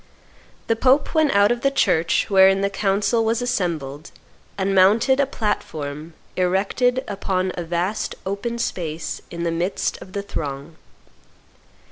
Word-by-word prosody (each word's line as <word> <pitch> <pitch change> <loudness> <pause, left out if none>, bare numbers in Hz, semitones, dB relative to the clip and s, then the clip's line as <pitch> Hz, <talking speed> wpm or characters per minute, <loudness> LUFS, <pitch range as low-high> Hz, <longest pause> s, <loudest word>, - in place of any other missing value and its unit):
The 225 - +1
Pope 265 +5 +2
went 315 -2 +3
out 200 +2 +4
of 240 0 -1
the 275 - +3
church 165 -11 +2
wherein 195 0 +5
the 200 0 0
Council 205 +3 +1
was 225 +1 +1
assembled 165 - -3 0.5
and 195 0 0
mounted 215 +8 +4
a 280 - +3
platform 155 - -4 0.2
erected 200 +8 +1
upon 190 -2 -1
a 175 - -4
vast 175 +5 -2
open 200 +5 -3
space 170 -8 -4
in 170 0 -5
the 170 - 0
midst 175 +4 -2
of 185 - -12
the 200 - -3
throng. 145 -4 -5
195 Hz, 140 wpm, -22 LUFS, 170-225 Hz, 0.5 s, wherein